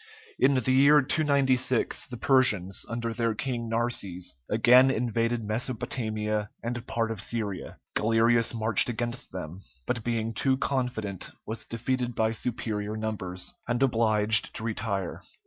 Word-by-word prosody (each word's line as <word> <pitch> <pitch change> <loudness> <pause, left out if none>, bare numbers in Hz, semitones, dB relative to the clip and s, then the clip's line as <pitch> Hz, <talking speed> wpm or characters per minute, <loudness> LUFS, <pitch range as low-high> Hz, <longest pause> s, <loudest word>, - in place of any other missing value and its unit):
In 140 - +4
the 130 0 +1
year 140 +2 +6
296, 130 -4 +1
the 125 - -7
Persians, 110 -9 +2
under 115 0 -3
their 115 -1 0
king 120 -2 -3
Narses, 100 -7 -2
again 125 +4 +6
invaded 115 -1 0
Mesopotamia 110 -2 -2
and 120 0 -4
part 115 -1 0
of 110 -4 -5
Syria. 105 -4 -3 0.2
Galerius 115 +1 +3
marched 110 0 +4
against 120 +1 -3
them, 90 0 -7 0.2
but 115 -3 -2
being 115 -1 -2
too 130 +4 +1
confident 125 -9 -2 0.2
was 110 +1 -5
defeated 125 +1 -2
by 110 0 +1
superior 110 -2 -3
numbers, 95 -5 -4
and 120 +2 +1
obliged 110 -3 +3
to - - -4
retire. 105 -4 -3
115 Hz, 130 wpm, -27 LUFS, 110-125 Hz, 0.2 s, year